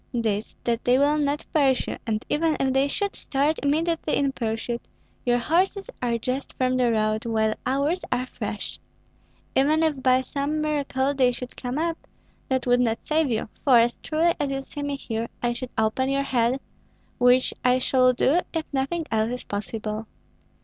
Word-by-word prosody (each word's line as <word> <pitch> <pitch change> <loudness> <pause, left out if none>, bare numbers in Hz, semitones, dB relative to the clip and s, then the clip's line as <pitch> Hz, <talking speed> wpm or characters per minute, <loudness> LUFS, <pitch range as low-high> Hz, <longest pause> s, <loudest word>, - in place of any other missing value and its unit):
"This, 220 -2 -1
that 235 0 0
they 245 +1 +4
will 290 +2 +3
not 290 +1 0
pursue; 270 -4 +2
and 215 -1 -1
even 315 +1 +1
if 265 -1 +1
they 270 +1 +3
should 400 +7 -2
start 290 +3 0
immediately 315 +2 +1
in 275 -1 +1
pursuit, 235 0 -3 0.5
your 240 0 +4
horses 380 - +1
are 240 -2 +1
just 255 +4 -3
from 255 0 +1
the 250 -2 +3
road, 215 0 +1
while 220 -1 +1
ours 285 +7 0
are 250 +1 +1
fresh. - - -5 0.8
Even 305 +4 +3
if 300 -4 0
by 255 0 +4
some 280 +3 -2
miracle 285 -3 0
they 260 -3 +3
should 250 +1 -7
come 250 +1 -4
up, 330 +1 -1 0.5
that 260 -1 0
would 245 0 +4
not 230 -2 0
save 310 -2 +1
you, 225 -2 -1 0.2
for, 265 -5 +6
as 235 +1 +3
truly 325 +2 +2
as 285 - 0
you 270 0 -2
see 290 +2 -7
me 285 0 -2
here, 230 -3 -3 0.2
I 240 0 +2
should 245 +1 -6
open 220 +4 +1
your 275 0 +1
head, 250 -1 +1 0.6
which 250 +1 +4
I 250 0 +4
shall 255 0 +4
do 265 +6 +3
if 325 -2 -1
nothing 295 +5 -1
else 220 0 +1
is 250 0 -4
possible. 215 +1 -4
260 Hz, 180 wpm, -25 LUFS, 240-290 Hz, 0.8 s, for